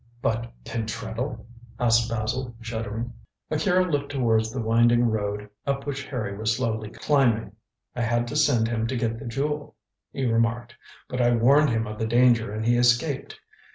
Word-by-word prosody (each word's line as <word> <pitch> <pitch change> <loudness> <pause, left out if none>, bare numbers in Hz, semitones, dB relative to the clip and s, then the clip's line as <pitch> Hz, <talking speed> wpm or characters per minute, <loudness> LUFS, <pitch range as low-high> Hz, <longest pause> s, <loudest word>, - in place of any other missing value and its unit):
"But 115 0 -1
Pentreddle?" 115 +3 -4 0.3
asked 115 -1 +3
Basil, 115 +2 -2
shuddering. 115 - -4 0.4
Akira 180 +4 +2
looked 145 -5 -2
towards 115 -5 +1
the 130 - -4
winding 120 +1 +4
road 105 -2 -1 0.2
up 140 0 -1
which 140 -1 -4
Harry 110 -7 -3
was 110 +3 0
slowly 110 -4 -2
climbing. 115 -6 +1 0.4
"I 125 - -2
had 120 +1 +1
to - - -5
send 140 -7 +3
him 115 -1 -1
to 130 +1 -2
get 115 -1 -1
the 115 - -7
Jewel," 145 +4 -3 0.4
he 135 - -2
remarked, 115 +1 0 0.3
"but 125 0 -2
I 120 0 +4
warned 140 +6 +5
him 115 -1 0
of 105 0 -7
the 110 - 0
danger 120 -2 +4
and 110 +1 -3
he 120 +1 +3
escaped. 120 +4 +1
120 Hz, 165 wpm, -25 LUFS, 110-130 Hz, 0.4 s, warned